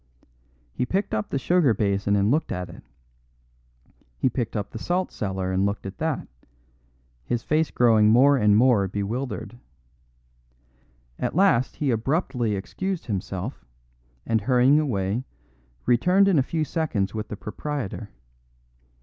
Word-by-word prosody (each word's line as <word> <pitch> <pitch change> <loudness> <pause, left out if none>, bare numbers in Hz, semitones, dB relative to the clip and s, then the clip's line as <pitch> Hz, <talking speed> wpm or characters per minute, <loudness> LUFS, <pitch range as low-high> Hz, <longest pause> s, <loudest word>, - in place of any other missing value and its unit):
He - - -1
picked 190 +11 -1
up 105 -1 -1
the - - -1
sugar 145 -4 +3
basin 100 0 +1
and 100 +2 +2
looked 155 +3 0
at 90 -1 -4
it; - - -12 1.4
he 130 - +1
picked 115 -2 -3
up 100 -2 -3
the 110 - -7
salt 180 +8 -1
cellar 95 -2 -3
and 95 +1 +1
looked 100 +1 -2
at 95 - -7
that, 160 -2 -2 1.0
his 120 - -2
face 155 0 +1
growing 110 -3 +4
more 135 +6 +6
and 105 -5 +4
more 115 -5 +4
bewildered. 110 +4 -4 1.6
At - - -2
last 180 -10 +3
he 145 -3 0
abruptly 120 - 0
excused 185 - -4
himself, 95 - -4 0.6
and 110 -1 +1
hurrying 130 +5 +4
away, 110 -5 -1 0.6
returned 180 +11 +4
in 180 -7 +4
a 130 - -1
few 160 -2 0
seconds 140 -13 -1
with 110 -1 -4
the 105 - -7
proprietor. 115 -2 -5
120 Hz, 140 wpm, -24 LUFS, 100-145 Hz, 1.6 s, more